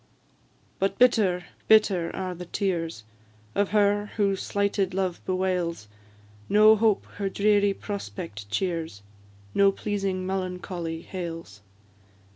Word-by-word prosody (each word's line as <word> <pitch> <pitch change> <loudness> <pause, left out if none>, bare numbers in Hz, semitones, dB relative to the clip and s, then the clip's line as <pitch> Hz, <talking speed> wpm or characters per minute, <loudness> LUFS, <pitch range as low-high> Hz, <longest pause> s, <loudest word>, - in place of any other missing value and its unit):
But 195 +1 0
bitter, 205 -8 +3 0.2
bitter 200 -6 +4
are 185 -1 -3
the 180 0 -9
tears 170 - -2 0.5
Of 200 -1 +1
her 205 0 +2
who 200 -2 +2
slighted 200 -1 -1
love 185 -2 -1
bewails; 180 - -1 0.6
No 215 +1 +7
hope 220 -1 +2
her 200 -1 -1
dreary 205 0 +2
prospect 170 - -6
cheers, 160 - -2 0.5
No 200 0 +5
pleasing 195 -2 -2
melancholy 180 -3 -4
hails. 165 - -7
190 Hz, 105 wpm, -26 LUFS, 175-200 Hz, 0.6 s, No